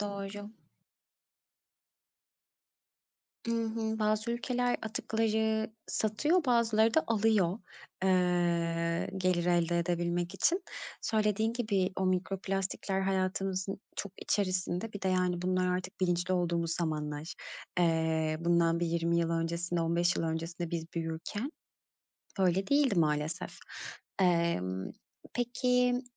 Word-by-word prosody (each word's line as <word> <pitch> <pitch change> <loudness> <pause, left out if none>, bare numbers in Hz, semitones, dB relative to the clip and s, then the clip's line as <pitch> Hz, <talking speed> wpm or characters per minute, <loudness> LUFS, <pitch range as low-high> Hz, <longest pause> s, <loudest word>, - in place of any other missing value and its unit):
Doğru. 205 0 -5 3.0
I - - -1
hı, 225 -1 -1
bazı 215 +2 +1
ülkeler 245 +1 0
atıkları 220 0 0 0.2
satıyor, 295 - +1
bazıları 230 -2 +3
da 320 - +4
alıyor. 215 -4 +2 0.5
Eee, 170 -2 +2
gelir 180 -2 +1
elde 175 -1 +2
edebilmek 175 0 -1
için. 355 +3 +2 0.4
Söylediğin 220 0 +1
gibi 200 -6 0
o 190 0 +1
mikroplastikler 190 +1 -1
hayatımızın 190 0 -1 0.2
çok 200 -2 -4
içerisinde. 185 +1 -1
Bir 205 - -7
de, 190 - +1
yani, 180 -1 +1
bunlar 185 0 +1
artık 185 +1 -7
bilinçli 180 0 +1
olduğumuz 170 -2 0
zamanlar. 155 -2 -3 0.4
Eee, 160 -2 +2
bundan 170 0 +3
bir 170 - +1
20 170 0 +1
yıl 170 0 +1
öncesinde, 170 +1 -1
15 170 +2 +2
yıl - - 0
öncesinde 165 +1 -3
biz 165 -1 -2
büyürken 165 - -3 0.9
öyle 190 +1 +2
değildi, 280 -7 +3
maalesef. 150 0 -1 0.6
Eee, 170 - +3 0.7
peki 250 +1 +2
185 Hz, 105 wpm, -31 LUFS, 170-220 Hz, 3.0 s, da